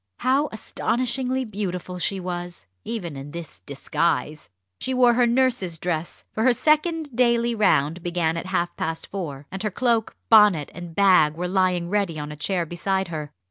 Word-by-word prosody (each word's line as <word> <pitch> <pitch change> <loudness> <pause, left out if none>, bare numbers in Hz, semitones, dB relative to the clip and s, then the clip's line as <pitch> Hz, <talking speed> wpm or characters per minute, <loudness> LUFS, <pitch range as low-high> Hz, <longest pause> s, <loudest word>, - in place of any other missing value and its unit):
How 275 +3 +2
astonishingly 255 +3 -1
beautiful 185 -4 -4
she 195 +2 0
was, 175 - -6 0.2
even 180 -10 -5
in 135 +1 -8
this 170 0 -8
disguise! 150 +2 -2 0.3
She 260 - -2
wore 245 -1 +5
her 245 0 +3
nurse's 235 -8 +1
dress; 170 0 -4
for 220 - -2
her 255 +2 +5
second 310 +1 +1
daily 235 -1 +3
round 170 -6 +2
began 170 -2 0
at 170 +2 -4
half 175 -2 -1
past 160 0 -3
four, 150 -8 -6
and 190 - -5
her 210 - 0
cloak, 230 +1 0
bonnet, 210 -9 +5
and 175 -2 -9
bag 180 -6 +5
were 180 +2 -3
lying 180 -2 +1
ready 195 -4 0
on 150 0 -5
a - - -7
chair 175 +4 -1
beside 190 +3 -2
her. 150 -3 -5
185 Hz, 170 wpm, -24 LUFS, 170-235 Hz, 0.3 s, wore